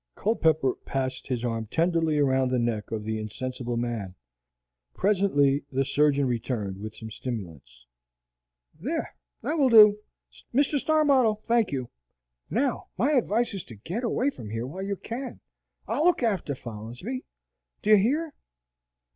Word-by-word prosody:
Culpepper 160 - +2
passed 130 -1 -3
his 125 -2 -2
arm 115 -2 -2
tenderly 165 +2 +1
around 130 -2 +3
the 130 - +1
neck 115 -3 -1
of 110 -2 -3
the 110 0 -2
insensible 120 +2 -4
man. 115 -6 -3 0.8
Presently 165 -9 +2
the 135 0 +1
surgeon 145 0 +3
returned 115 -5 -2
with 110 +1 -7
some 110 0 -9
stimulants. 80 - -7 0.9
"There, - - -3 0.3
that 305 +6 -1
will 270 -3 +5
do, 210 -2 +8 0.6
Mr. 285 +1 +3
Starbottle, 270 -9 +3
thank 230 -2 +2
you. 130 -3 -3 0.6
Now - - 0
my 250 +10 +2
advice 240 -4 +1
is 195 - -4
to 115 - -11
get 175 - -5
away 250 +4 +1
from 110 - -9
here 115 +2 -3
while 165 +9 -6
you 200 +1 -2
can. 245 +5 -6 0.5
I'll 305 - 0
look 355 -7 +3
after 190 -11 0
Folinsbee. 120 - -6 0.6
Do 215 - +2
you 215 - +9
hear?" 290 +10 +1
145 Hz, 145 wpm, -27 LUFS, -, 0.9 s, you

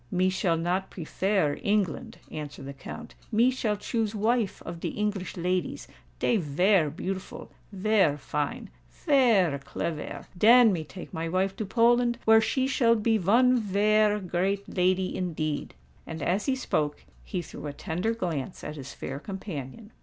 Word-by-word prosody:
"Me 185 +1 +2
shall 175 -3 +1
not 180 +3 -1
prefare 185 -2 -1
England," 200 -3 -1
answered 145 -3 -7
the 140 - -6
Count: 185 - -9 0.2
"me 235 +4 +4
shall 220 -5 -1
choose 220 +1 -2
wife 220 0 +1
of 170 0 -6
de - - -3
English 205 -4 -3
ladies—dey 180 +5 -2
vare 175 +1 +2
beautiful—vare 190 +1 -1
fine—vare 185 - 0
clevare. 150 +3 -5
Den 225 +3 +7
me 165 -3 -2
take 180 +4 -10
my 165 +1 -3
wife 190 +2 0
to 210 0 -4
Poland, 240 +1 +3
where 220 0 +7
she 260 +4 0
shall 235 -3 +3
be 220 0 +2
von 240 +7 +4
vare 210 +1 +3
great 190 +2 -1
lady 185 0 +1
indeed." 155 -5 -3 0.3
And, 160 -2 -5
as 190 +8 0
he 265 - +2
spoke, 150 - -1 0.2
he 180 -2 -4
threw 155 - -8
a - - -3
tender 180 +10 -2
glance 170 - -4
at 150 0 -6
his 135 -1 -8
fair 135 +1 -5
companion. 190 - -7
190 Hz, 145 wpm, -27 LUFS, 165-220 Hz, 0.3 s, Den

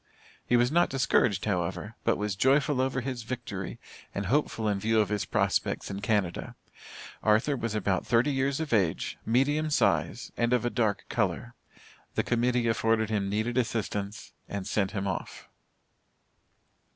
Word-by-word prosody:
He 120 - +4
was 120 +2 +3
not 175 +2 +3
discouraged, 125 -7 +2
however, 95 +1 -2
but - - +2
was 105 -2 -2
joyful 135 +4 +3
over 130 0 0
his 125 -1 -4
victory 115 -5 -5 0.4
and 100 - -2
hopeful 115 -1 0
in 100 -2 +1
view 110 +2 +2
of 105 -3 +2
his 105 -1 -1
prospects - - 0
in 100 - -4
Canada. 100 -6 -1 0.7
Arthur 110 +7 +3
was 115 -4 -3
about 100 0 0
thirty 120 +5 +3
years 135 +1 0
of 155 -5 -2
age, 95 -7 +1
medium 145 +6 +2
size, 95 - +1
and 120 +1 +1
of 120 -2 +2
a 120 - 0
dark 110 -4 0
color. - - -1 0.6
The - - +2
Committee 120 0 +1
afforded 110 -1 +1
him 100 -2 0
needed 110 +5 0
assistance, 105 -4 -3 0.2
and 100 -2 -4
sent 100 -3 0
him 100 -2 -3
off. 95 - -5
110 Hz, 155 wpm, -28 LUFS, 100-125 Hz, 0.7 s, He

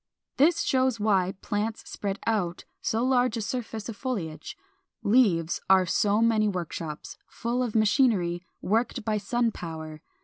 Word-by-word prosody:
This 335 +4 +4
shows 260 -3 +1
why 195 -3 +2
plants 215 +1 -2
spread 200 -1 -3
out 195 -6 -1 0.2
so 225 +2 0
large 250 -2 +2
a - - -2
surface 225 -2 -4
of 230 - -5
foliage. 185 - -4 0.5
Leaves 200 -8 +3
are 190 -1 +6
so 205 +5 +2
many 220 -2 +3
workshops, 170 -5 -5
full 240 +2 -2
of 240 -3 -2
machinery 210 -6 +3 0.2
worked 230 +2 0
by 215 -1 0
sun 235 +3 0
power. 160 -4 -7
215 Hz, 140 wpm, -27 LUFS, 185-235 Hz, 0.5 s, are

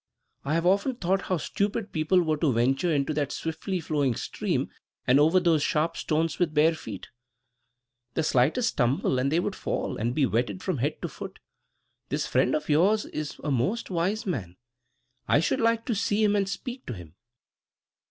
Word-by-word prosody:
"I 145 +3 0
have 165 +1 0
often 200 +8 +2
thought 190 -3 0
how 185 - -1
stupid 200 +5 -2
people 175 +3 +2
were 155 -2 0
to 150 -2 +2
venture 135 +9 +1
into 145 0 +1
that 145 -2 -1
swiftly 180 +3 -3
flowing 145 -6 0
stream - - -2 0.3
and 130 +3 +5
over 160 +5 +5
those 170 -4 +3
sharp 160 +3 +1
stones 160 -1 -1
with 165 -4 0
bare 155 +2 +5
feet. 110 - -8 1.1
The 160 - +1
slightest 155 - +2
stumble 130 0 +1
and 135 +2 0
they 165 - +3
would 190 +2 -2
fall, - - -3
and 120 +3 -1
be 145 - +3
wetted 115 -5 -1
from - - -1
head - - -1
to - - 0
foot. - - -8 0.7
This - - -1
friend - - +2
of 155 - -3
yours 190 +8 +3
is 150 -1 -5
a 150 - -1
most 140 - -1
wise 185 +5 0
man. 100 - -3 0.7
I - - +4
should 165 - 0
like 230 0 +2
to 240 - 0
see 215 0 +1
him 210 -1 +3
and 195 -1 +1
speak 250 +5 -6
to - - -3
him." 85 -6 -11
160 Hz, 185 wpm, -27 LUFS, 140-190 Hz, 1.1 s, and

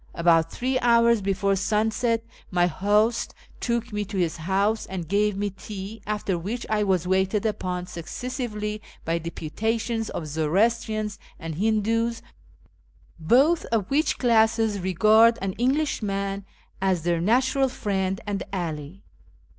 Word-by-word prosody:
About 165 -1 +3
three 255 +1 -1
hours 235 -2 +4
before 195 0 +1
sunset 220 +3 0 0.3
my 175 -1 +3
host 210 +6 +1 0.2
took 235 -1 -2
me 210 0 -1
to 200 0 -6
his 170 -3 0
house 195 +6 0
and 180 -3 -5
gave 205 +2 +1
me 205 0 -1
tea, 200 +2 -8
after 205 -4 -1
which 220 +8 -4
I 215 -1 +2
was 185 -4 +1
waited 190 +3 +1
upon 180 -4 -2
successively 210 - -5 0.2
by 165 +1 0
deputations 220 +8 -2
of 160 - -4
Zoroastrians 210 +8 0 0.2
and 165 -1 -6
Hindoos, 225 +5 0 1.0
botli 280 - +4
of 220 -2 -1
which 300 +4 +2
classes 225 -3 +3
regard 215 +5 +5
an 195 -1 -2
Englishman 200 -8 0 0.4
as 185 -4 +1
their 170 -1 +1
natural 260 +6 +2
friend 195 -5 -2
and 205 -1 -2
ally. 170 -1 -4
205 Hz, 130 wpm, -25 LUFS, 185-225 Hz, 1.0 s, regard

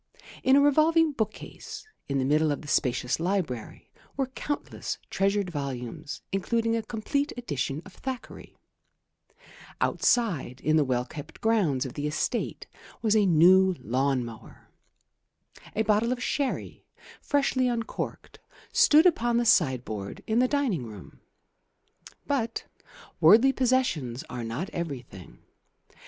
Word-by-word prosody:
In 265 - +4
a 280 - +6
revolving 310 +3 +4
book 220 -6 -1
case - - -10 0.2
in 140 - 0
the 130 - +1
middle 150 +2 +3
of 145 - -3
the - - -10
spacious 125 -3 0
library 165 - -3 0.3
were 270 - +1
countless 290 +2 -4
treasured 195 -1 +1
volumes, 135 -2 -5
including 230 +4 0
a 230 - 0
complete 245 +7 -2
edition 150 - -3
of 190 - -13
Thackeray; 260 +2 -7 1.2
outside 175 - +1
in 155 +1 +2
the 155 - +4
well 125 -2 0
kept 145 +3 -10
grounds 190 - +1
of 130 - -6
the 145 0 -3
estate 150 +10 -2 0.4
was 220 -1 +3
a 210 -2 +4
new 185 +3 +6
lawn 130 +2 0
mower; 115 -2 -12 1.1
a 220 - +2
bottle 215 +2 +2
of 250 -1 -2
sherry, 280 -2 -2 0.4
freshly 275 -3 +1
uncorked, 235 -2 -4 0.3
stood 310 +3 +6
upon 240 -9 +3
the 240 - +1
sideboard 125 - +1
in 225 +2 +1
the 255 - +4
dining 255 - 0
room. 105 -4 -12 1.1
But 235 -5 -2 0.5
worldly 220 +11 +6
possessions 235 - 0
are 125 -2 -4
not 115 +12 -4
everything. 130 - -7
190 Hz, 130 wpm, -27 LUFS, -, 1.2 s, a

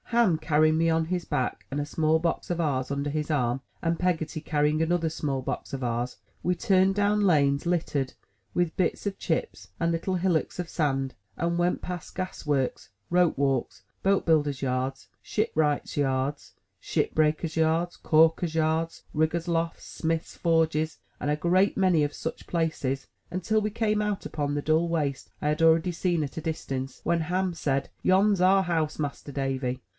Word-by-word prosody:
Ham 230 -8 +3
carrying 155 0 +3
me 165 0 +3
on 160 0 +2
his 180 +1 -2
back 130 -6 -2
and 140 - -1
a 145 - -1
small 155 +1 +2
box 170 0 -1
of 175 -1 -1
ours 135 -5 0
under 140 +1 -1
his 150 +1 -2
arm, 125 -3 +1 0.2
and 165 0 0
Peggotty 165 -3 -1
carrying 150 0 +1
another 165 0 +1
small 140 -4 -2
box - - -4
of 135 -2 -2
ours, 120 +1 -2 0.3
we 180 - +2
turned 190 +1 +3
down 205 +1 +2
lanes 145 -7 +3
littered 155 -6 0 0.4
with 175 -2 0
bits 185 +2 0
of 200 -1 -2
chips 110 - -2
and 170 0 +1
little 170 +3 -1
hillocks 180 -2 0
of 180 - -2
sand, 135 -5 -1 0.2
and 170 0 0
went 175 +1 +1
past 180 -2 -6
gas 185 -2 -5
works, 140 -8 -1 0.2
rope 175 -3 +3
walks, 135 -2 0 0.2
boat 195 0 +2
builders' 145 -4 +2
yards, 130 0 -2
shipwrights' 155 -9 0
yards, 135 0 -1 0.2
ship - - -1
breakers' 155 +1 +1
yards, 165 +2 +1
calkers' 160 +1 +3
yards 160 +1 0
riggers' 160 +2 0
lofts, 165 -1 -1
smiths' 165 0 -3
forges, 160 -2 +1 0.2
and 145 - -1
a 150 - +1
great 185 +5 +2
many 185 -5 +4
of 145 - -1
such 160 - -6
places, 155 -5 -1 0.2
until 215 +4 0
we 210 - 0
came 215 -1 0
out 210 -2 -2
upon 145 -1 -2
the 145 - 0
dull 160 +3 +2
waste 145 -5 -1
I - - -1
had 150 +1 0
already 165 +2 +4
seen 170 -1 0
at 140 - -6
a - - -2
distance; 135 -4 -4
when 170 0 +2
Ham 180 +3 0
said, 140 -4 -1
Yon's 195 +1 +3
our 190 +1 +5
house. 160 -4 -1
Master 145 -1 -4
Davy!" 135 -2 -2
160 Hz, 175 wpm, -27 LUFS, 145-175 Hz, 0.4 s, our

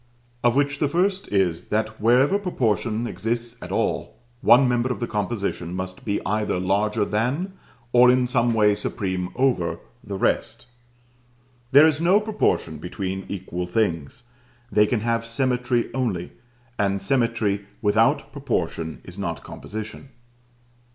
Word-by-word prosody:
Of 120 0 +3
which 145 0 +1
the 145 - +2
first 185 +6 0
is, 90 -4 +1
that 110 +1 -1
wherever 130 - +4
Proportion 115 - -1
exists 120 +1 -3
at - - -8
all, - - -1 0.2
one 130 +1 +6
member 125 +1 +1
of - - -3
the 120 - -1
composition 100 -5 -3
must 95 0 -5
be 100 -1 0
either 105 -2 0
larger 100 +3 +1
than, 130 - -1 0.4
or 125 0 +7
in 125 0 +4
some 120 -2 +1
way 105 -2 +4
supreme 95 -3 -3
over, 120 -11 +1 0.3
the 100 -1 -5
rest. - - 0 1.1
There 145 +3 +8
is 155 -1 +2
no 185 +4 +5
proportion 215 0 -1
between 95 0 -4
equal 90 -2 -4
things. 90 - -1 0.5
They 105 +1 +4
can 115 -2 0
have 115 0 0
symmetry 125 0 0
only, 115 -10 -2 0.5
and 100 -1 +1
symmetry 110 -3 0 0.2
without 110 +2 +2
proportion 80 -1 -3
is 90 +2 -10
not 85 -4 -3
composition. 110 +5 -8
110 Hz, 135 wpm, -24 LUFS, 100-125 Hz, 1.1 s, There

